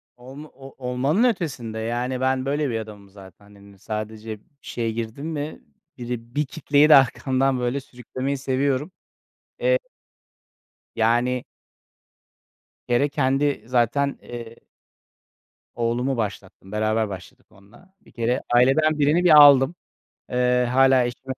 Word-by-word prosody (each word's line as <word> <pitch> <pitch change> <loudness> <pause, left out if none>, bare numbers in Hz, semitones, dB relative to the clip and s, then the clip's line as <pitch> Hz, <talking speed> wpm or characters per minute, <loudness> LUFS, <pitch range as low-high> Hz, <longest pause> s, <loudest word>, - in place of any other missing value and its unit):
Olmo 135 +5 -11
o 135 0 -13
olmanın 140 - +1
ötesinde, 140 - -2
yani, 120 +3 -3
ben 130 0 0
böyle 145 +1 -1
bir 115 -2 -2
adamım 105 -2 -10
zaten. 95 0 -16
Hani, 100 -1 -18
sadece 110 +1 -6
bir - - -32 0.2
şeye 115 -1 -3
girdim 115 +6 -5
mi 155 -1 -5 0.4
biri 120 0 -7
bir 150 0 +1
kitleyi 145 +1 +2
de 150 - +9
arkamdan 135 0 +2
böyle 125 +3 -1
sürüklemeyi 130 +1 -5
seviyorum. 135 +4 -1 0.7
Eee - - +2 1.2
Yani 120 +2 +1 1.5
Bir - - +1
kere 140 +4 +2
kendi 140 +1 0
zaten, 125 +3 0
eee 115 -1 -9 1.2
oğlumu 120 +3 -1
başlattım, 100 -3 -6
beraber 110 0 0
başladık 95 -2 -11
onunla. 115 - -21
Bir 210 - -21
kere 120 +2 -1
aileden 150 +5 +3
birini 150 +5 +3
bir 155 -4 +7
aldım. 140 +2 +6 0.6
Eee, 125 0 +2
hâlâ 130 -1 +4
eşime 120 +2 -5
125 Hz, 125 wpm, -23 LUFS, 115-140 Hz, 1.5 s, de